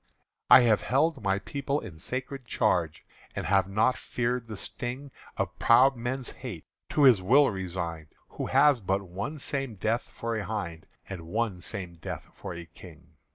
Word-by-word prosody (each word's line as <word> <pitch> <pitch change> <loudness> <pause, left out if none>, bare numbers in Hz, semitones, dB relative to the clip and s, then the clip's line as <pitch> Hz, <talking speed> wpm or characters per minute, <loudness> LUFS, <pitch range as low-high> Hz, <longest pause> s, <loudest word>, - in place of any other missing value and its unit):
"I - - +10
have 115 -4 +4
held 145 +2 +1
my 95 -1 +1
people 140 +7 -2
in 90 - -10
sacred 130 - -5
charge, 90 -10 0 0.3
And - - -3
have 95 +1 +2
not 110 +5 +2
feared 120 0 -2
the 110 -2 -7
sting 130 +7 -5 0.3
Of - - -3
proud 130 +4 +6
men's 125 +2 -4
hate, 110 - -8 0.2
to 150 - +2
His 125 -8 +7
will 135 +8 +5
resign'd 85 -4 -4 0.2
Who - - -5
has 145 -5 +4
but 95 +1 0
one 100 - -5
same 135 -4 -3
death 110 +5 -1
for 115 0 -4
a 110 - -2
hind 85 -8 -5 0.2
And 90 -4 -7
one 105 -1 -1
same 90 -1 -6
death 80 - -7
for - - -7
a 85 0 -7
King. 80 - -15
110 Hz, 170 wpm, -28 LUFS, 95-130 Hz, 0.3 s, I